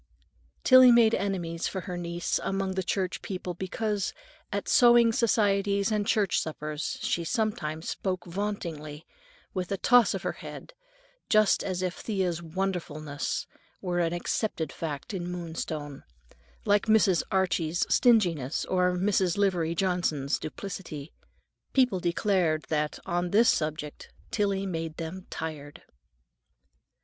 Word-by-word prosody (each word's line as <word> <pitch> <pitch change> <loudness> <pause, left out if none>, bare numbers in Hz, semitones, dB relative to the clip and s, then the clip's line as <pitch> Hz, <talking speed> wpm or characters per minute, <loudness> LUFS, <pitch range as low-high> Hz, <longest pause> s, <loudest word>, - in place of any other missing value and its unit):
Tillie 255 -1 +8
made 230 -2 +6
enemies 175 -4 -1
for 190 - -4
her 180 0 -6
niece 170 0 -2
among 195 -1 -1
the 190 - -1
church 185 0 -2
people 185 -2 -5
because, 200 +2 -2 0.4
at - - -3
sewing 240 -3 +6
societies 200 -2 +2
and 210 -1 0
church 205 -5 +2
suppers, 155 -1 -4
she 170 - 0
sometimes 165 -7 -2
spoke 185 -2 -3
vauntingly, 170 -5 -5 0.5
with 185 -1 -3
a 195 - 0
toss 245 +3 +5
of - - -5
her - - 0
head, - - -9 0.6
just 215 -1 +4
as 185 -1 -2
if 180 -1 -3
Thea's 185 -6 -1
"wonderfulness" 160 -4 -3 0.3
were 175 -2 -2
an 165 -1 +1
accepted 175 -2 -2
fact 150 +3 -5
in 175 -2 -3
Moonstone, 160 -4 -5 0.6
like 205 +1 +3
Mrs. 215 -5 +4
Archie's 175 -3 +1
stinginess, 175 - +3
or 180 -1 +2
Mrs. 185 -1 +1
Livery 175 -5 +1
Johnson's 170 -6 0
duplicity. 155 -3 -7 0.6
People 250 -8 +3
declared 175 -2 +1
that, 150 -1 -1
on 175 +1 -1
this 225 +5 +5
subject, 155 -1 -2 0.2
Tillie 200 -2 0
made 165 -3 -4
them 170 +3 -6
tired. 150 -3 -6
180 Hz, 125 wpm, -28 LUFS, 165-200 Hz, 0.6 s, Tillie